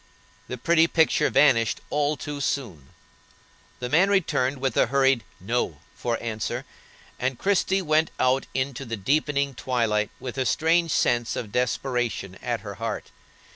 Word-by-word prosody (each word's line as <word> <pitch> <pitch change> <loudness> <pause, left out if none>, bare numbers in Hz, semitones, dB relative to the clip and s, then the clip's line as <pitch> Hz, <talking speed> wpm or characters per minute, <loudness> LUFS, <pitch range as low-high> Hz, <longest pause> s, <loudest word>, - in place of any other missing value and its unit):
The 125 - -5
pretty 165 +5 +4
picture 160 -1 +3
vanished 115 -6 +3
all 150 0 +1
too 145 -1 -5
soon; 105 - -3 0.9
the 125 - -4
man 170 +9 +4
returned 145 -9 +1
with 135 0 -1
a - - +4
hurried 135 -2 +3 0.2
"No" 95 -5 -1 0.2
for 120 -1 -2
answer, 110 -2 -3 0.5
and 125 0 -1
Christie 190 +1 +1
went 155 0 +2
out 130 +1 +2
into 135 0 -2
the 115 -3 -5
deepening 140 +5 0
twilight 115 -4 0
with 130 0 -6
a 130 - +1
strange 165 +4 +2
sense 120 -5 +1
of 105 - -5
desperation 125 -5 -1
at - - -2
her - - -7
heart. - - -4
130 Hz, 145 wpm, -25 LUFS, 120-150 Hz, 0.9 s, pretty